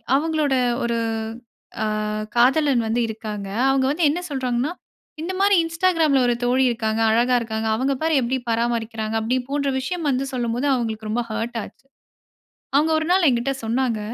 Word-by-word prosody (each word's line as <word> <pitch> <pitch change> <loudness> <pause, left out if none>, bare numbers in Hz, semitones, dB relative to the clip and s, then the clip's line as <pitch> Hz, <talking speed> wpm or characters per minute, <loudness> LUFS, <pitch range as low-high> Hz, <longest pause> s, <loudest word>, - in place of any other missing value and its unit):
அவுங்களோட 305 -1 +1 0.3
ஒரு 235 0 0 0.9
ஆ - - +1 0.5
காதலன் 265 +1 +4
வந்து 235 +2 0
இருக்காங்க. 215 -2 -6 0.2
அவுங்க 270 -1 +2
வந்து 320 +3 +1
என்ன 315 +5 -1
சொல்றாங்கன்னா, 260 0 -1 0.5
இந்தமாரி 380 +4 +2
இன்ஸ்டாகிராம்ல 330 -4 +2
ஒரு 240 - +3
தோழி 250 +2 +3
இருக்காங்க, 225 -2 -1
அழகா 240 +3 +3
இருக்காங்க. 220 -1 -3
அவுங்க 265 +4 0
பாரு 320 0 +1
எப்பிடி 255 +2 0
பராமரிக்கிறாங்க 225 -1 -1
அப்பிடி 230 +4 0
போன்ற 280 0 0
விஷயம் 330 +5 -3
வந்து 265 0 0
சொல்லும்போது, 245 +2 -1
அவுங்களுக்கு 220 -3 -2
ரொம்ப 230 +3 0
ஹர்ட் 225 +2 -3
ஆச்சு. - - -14 0.9
அவுங்க 305 +3 +3
ஒரு 315 - -3
நாள் 365 -2 +4
எங்கிட்ட 250 +2 0
சொன்னாங்க. 235 -1 0
250 Hz, 150 wpm, -22 LUFS, 230-290 Hz, 0.9 s, காதலன்